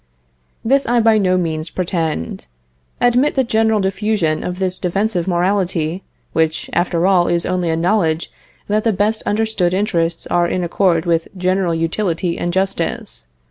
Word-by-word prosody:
This 275 +4 +2
I 240 0 +3
by 225 -1 +4
no 185 -2 +2
means 160 -2 -2
pretend. 165 - -3 0.5
Admit 245 +4 +2
the 265 - +3
general 220 -2 +2
diffusion 190 -5 0
of 180 0 -4
this 185 -1 -1
defensive 190 0 -1
morality 180 -2 0 0.3
which, 160 -1 0
after 175 0 +1
all, 185 -2 +4
is 170 0 +1
only 180 -2 -1
a 160 - +1
knowledge 170 -2 0 0.4
that 210 +1 +1
the 225 - +2
best 210 +3 0
understood 205 -4 +1
interests 170 -5 0
are 175 0 +1
in 180 +1 -1
accord 175 -1 +1
with 165 -1 +1
general 185 -1 0
utility 170 +1 -1
and 175 - -1
justice. 190 - -2
185 Hz, 150 wpm, -18 LUFS, 170-210 Hz, 0.5 s, by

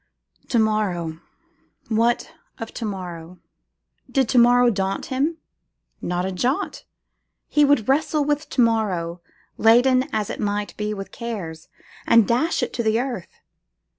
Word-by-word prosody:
To 240 - +1
morrow! 195 -7 0 0.7
what 230 +2 +1 0.3
of 225 - -7
to 230 - -4
morrow? 180 -4 -6 0.7
Did 270 -3 +1
to 250 - +4
morrow 245 0 +5
daunt 195 -2 -2
him? 295 +6 0 0.6
Not 180 +1 -1
a 190 - -2
jot. 245 +10 -2 0.6
He 295 - +3
would 285 -7 +3
wrestle 295 +2 +2
with 295 +1 -1
to 255 - +1
morrow, 190 -7 0 0.4
laden 255 +3 +5
as 210 -2 -1
it - - -6
might 205 0 -2
be 210 0 -3
with 195 -1 -7
curses, 185 -9 -6 0.4
and 230 -3 +6
dash 285 +9 +1
it - - -3
to 240 - -1
the 220 0 +2
earth. 245 -8 -5
225 Hz, 140 wpm, -23 LUFS, 190-250 Hz, 0.7 s, and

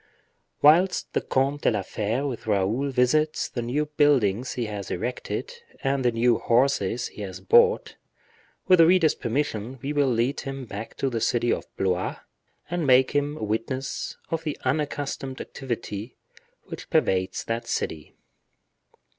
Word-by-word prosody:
Whilst 175 +6 +4
the - - +1
Comte 140 +2 0
de - - +3
la 105 -4 -1
Fere 110 +8 -2
with 125 -5 -5
Raoul 105 +7 +1
visits 135 +4 +2
the 120 - -4
new 130 +6 -1
buildings 135 -7 +2
he 120 - -2
has 105 -3 -5
erected, 125 - -4 0.3
and 135 -1 +1
the 120 - +3
new 115 +1 +2
horses 120 -2 +1
he - - -10
has 95 -2 -6
bought, 475 +1 +3 0.7
with 185 -2 +6
the 165 - +8
reader's 170 -4 +4
permission 125 -1 -2
we 145 +2 -2
will 145 -2 +2
lead 120 +3 0
him 135 -1 -5
back 105 0 -8
to 135 - -1
the 115 -2 -2
city 120 +1 +2
of - - -4
Blois, 95 -1 0 0.5
and 170 -2 -2
make 130 0 +5
him 145 +1 0
a - - -6
witness 115 +6 -3
of 165 -1 -1
the 150 -3 -3
unaccustomed 145 -3 -2
activity 120 -4 -5 0.5
which - - -9
pervades 95 0 +1
that 115 +1 -3
city. 75 - -3
130 Hz, 155 wpm, -25 LUFS, 115-145 Hz, 0.7 s, the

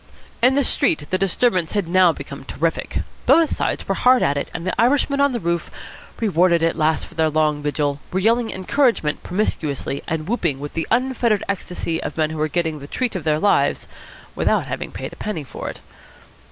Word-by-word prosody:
In 255 +3 +5
the 280 - +3
street 155 - +1
the 185 - +1
disturbance 190 -2 +1
had 205 -5 0
now 180 0 +5
become - - -8
terrific. - - -2 0.3
Both 330 -1 +5
sides - - -2
were - - +1
hard 250 0 +4
at 140 - +2
it, 140 - -3
and 170 - -6
the 185 - -1
Irishmen 280 +3 +2
on 280 0 +4
the 240 - -2
roof, 170 -2 -2 0.5
rewarded 175 -5 +3
at 165 - +2
last 155 0 +1
for - - -16
their 160 -1 +2
long 155 -1 +1
vigil, 145 -1 -1
were 185 - -1
yelling 230 +3 +2
encouragement 190 - +1
promiscuously 155 -8 -2
and 160 -1 -3
whooping 175 - -1
with 145 +1 -6
the 165 - -2
unfettered 240 -3 +1
ecstasy 180 -4 -3
of - - -5
men 155 -1 +1
who 155 -1 -4
are 155 - +2
getting 160 -1 -1
the 140 - -9
treat 250 - -2
of 180 - -3
their 155 -1 +2
lives 205 +6 +2 0.5
without - - +1
having - - -5
paid - - -6
a - - -13
penny 200 -8 -4
for 135 - -7
it. - - -9
175 Hz, 200 wpm, -21 LUFS, 155-230 Hz, 0.5 s, In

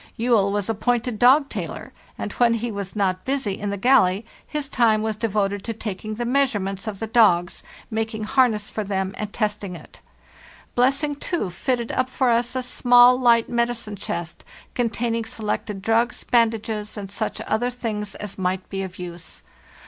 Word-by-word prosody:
Juell 225 -4 +3
was 205 -1 -1
appointed 225 +1 0
dog 275 +4 +6
tailor, - - -6 0.2
and - - -4
when 235 -1 +3
he 230 +1 -3
was 200 -1 -5
not 185 -3 0
busy 265 -8 -2
in 205 - -3
the 200 - -2
galley, 215 -3 +3 0.2
his 300 -2 -3
time 225 -5 +2
was 220 -1 -1
devoted 205 -3 -1
to 230 - -3
taking 215 0 -5
the 240 +2 -3
measurements 225 -7 0
of 205 -3 -4
the 225 - -2
dogs, 210 -7 +3 0.3
making 220 0 -2
harness 220 -3 +2
for 215 - -2
them 190 -1 -2
and 210 -1 -5
testing 210 -4 -2
it. - - -14 0.7
Blessing, 275 +4 +2
too, 285 - -2
fitted 235 +6 -1
up 255 0 0
for 260 -1 +1
us 240 +2 +1
a 255 - -1
small, 245 0 +6
light 235 -2 +4
medicine 235 -3 -1
chest, 170 -3 -5 0.3
containing 230 -1 -1
selected 210 -2 -3
drugs, 230 +3 +1
bandages, 220 -2 0
and 200 -2 -6
such 215 +1 -3
other 230 +3 0
things 215 -5 -4
as 205 -1 -7
might 185 0 -1
be 195 -1 -2
of 190 +1 -6
use. 175 -2 -8
220 Hz, 170 wpm, -23 LUFS, 200-245 Hz, 0.7 s, dog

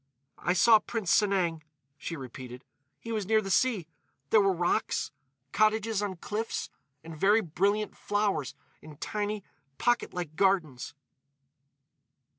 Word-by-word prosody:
"I 175 - +1
saw 215 +5 +6
Prince 215 -5 -3
Sanang," 185 -6 +2 0.3
she 165 - -6
repeated. 130 -2 -9 0.3
"He 230 - -7
was 215 -4 -2
near 220 0 +4
the 195 -2 -4
sea. 210 -5 +2 0.4
There 215 - +6
were 195 -1 +3
rocks—cottages 180 - -1
on 200 -2 -2
cliffs—and 165 -7 -6
very 205 +7 +4
brilliant 200 +4 0
flowers 200 -9 -1 0.3
in 150 -2 -12
tiny, 210 +3 -3 0.3
pocket 240 0 +1
like 175 -4 -5
gardens. 160 -10 +1
195 Hz, 115 wpm, -29 LUFS, 155-215 Hz, 0.4 s, saw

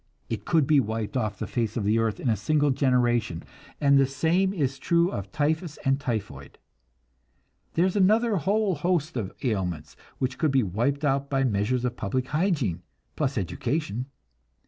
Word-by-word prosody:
It 110 -3 -4
could 160 -4 +3
be 150 0 +4
wiped 110 -2 -2
off 105 -6 -1
the - - -3
face 115 -2 -2
of 110 - -1
the 105 +3 +2
earth 115 -2 0
in - - -3
a 115 - +3
single 145 +8 +1
generation; 120 - +1 0.4
and 140 -2 +5
the 135 - +4
same 165 +8 +1
is 135 -8 -1
true 170 +4 +2
of 100 0 -5
typhus 155 - -1
and 135 +1 +2
typhoid. 115 -7 -5 1.2
There 170 - +4
is 190 - 0
another 215 +3 +3
whole 200 +4 +1
host 165 0 -1
of 110 -6 -3
ailments 90 - -2 0.2
which 130 0 -2
could 155 - +2
be 135 -2 +3
wiped 120 - -1
out 140 0 0
by 135 -1 +1
measures 120 +2 0
of 120 0 -3
public 125 +5 -2
hygiene, 150 - 0 0.3
plus 140 -3 -1
education. 120 - -2
135 Hz, 170 wpm, -26 LUFS, 110-155 Hz, 1.2 s, and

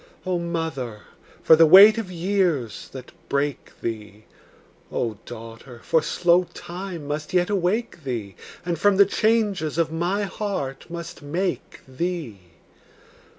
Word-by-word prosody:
O 180 -1 0
mother, 160 -10 -4 0.4
for - - +8
the 165 0 +6
weight 205 +6 +9
of 195 -5 -5
years 175 - -1
that 130 -2 -10 0.2
break 140 -1 -2
thee! 105 -2 -6 0.7
O 110 -4 -2
daughter, 115 +1 -10
for 160 - +2
slow 175 +3 +2
time 175 -3 -7
must 150 +4 -4
yet 180 +2 +2
awake 195 -1 -1
thee, 115 -8 -4 0.3
And 170 -3 -2
from 205 +1 +3
the 200 - +7
changes 200 -7 0
of 165 -2 +1
my 175 +5 -1
heart 190 -11 -4
must 170 -1 -7
make 170 +5 -3
thee! 150 - -4
165 Hz, 130 wpm, -23 LUFS, 130-185 Hz, 0.7 s, weight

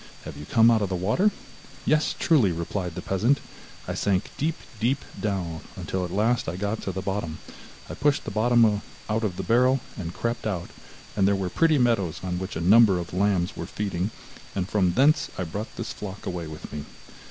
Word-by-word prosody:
Have - - -7
you 75 - -9
come 115 0 +6
out 110 -2 +3
of 100 - 0
the 95 - -1
water?' 110 - +2 0.6
'Yes, 155 0 +2
truly,' 130 - +4
replied 85 +1 -3
the - - -5
peasant, 115 +9 +2 0.5
'I - - -2
sank 95 -1 0
deep, 160 +2 0 0.2
deep 125 +5 +2 0.2
down, 90 -6 -2
until 95 -1 -3
at 90 - -3
last 110 +2 +1
I 85 - -4
got 105 +3 -2
to 95 - -3
the 95 +1 -4
bottom; 95 -5 -2 0.5
I - - -6
pushed 145 -1 +1
the - - -4
bottom 110 -1 +4 0.3
out 110 +1 0
of 95 -5 -1
the - - -3
barrel, 125 +3 +4 0.2
and 85 -5 -5
crept 115 +4 -2
out, 90 -5 -3 0.4
and 100 -2 +3
there 100 - +3
were 95 -2 -2
pretty 160 - +3
meadows 100 - +2
on 90 -1 -2
which 95 - -5
a - - -2
number 100 +2 +6
of 85 -1 -5
lambs 95 -2 +1
were - - -5
feeding, 100 -2 -2 0.5
and 95 -2 -1
from 95 -4 +2
thence 150 - +4
I 90 - -1
brought 100 +7 -5
this 115 - -4
flock 100 -1 -7
away 90 -3 -3
with 75 -1 -9
me. 75 -1 -5
100 Hz, 205 wpm, -26 LUFS, 90-115 Hz, 0.6 s, come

